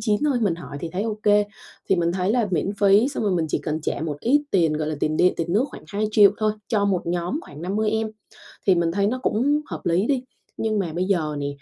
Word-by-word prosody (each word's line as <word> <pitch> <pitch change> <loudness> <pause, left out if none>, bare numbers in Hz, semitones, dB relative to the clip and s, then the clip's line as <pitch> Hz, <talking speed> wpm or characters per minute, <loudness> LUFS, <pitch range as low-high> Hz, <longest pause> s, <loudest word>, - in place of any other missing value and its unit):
9 210 0 +1
thôi. 285 -4 +2
Mình 200 -7 +2
hỏi 165 -4 -9
thì 170 - -4
thấy 190 +3 -1
OK, 210 -2 +2 0.4
thì 190 - +3
mình 170 0 +1
thấy 185 +3 0
là 235 -4 +1
miễn 185 +2 0
phí 205 +5 +5
xong 285 - -4
rồi 200 - +1
mình 165 -3 0
chỉ - - 0
cần 155 0 -3
trả 150 - -3
một 150 -2 -3
ít 285 +5 +3
tiền, 165 -5 +3
gọi 155 0 -2
là, 155 - -3
tiền 155 0 0
điện, 180 - +4
tiền 170 0 -2
nước 220 +7 +3
khoảng - - -11
2.000.000 210 +1 +4
thôi 215 -1 +1 0.2
cho 210 -3 +1
một 190 -4 0
nhóm 175 - -1
khoảng 150 +2 -11
50 210 +4 0
em 220 0 -1 0.6
thì 190 - +6
mình 170 -1 +1
thấy 200 +3 +1
nó 255 +4 -1
cũng 285 +7 +1
hợp - - -7
lý 175 +5 +2
đi. 265 -3 0 0.3
Nhưng 215 -2 0
mà 170 -5 -2
bây 180 +2 -1
giờ 160 -6 0
nè, 140 - -2
195 Hz, 260 wpm, -23 LUFS, 170-215 Hz, 0.6 s, thì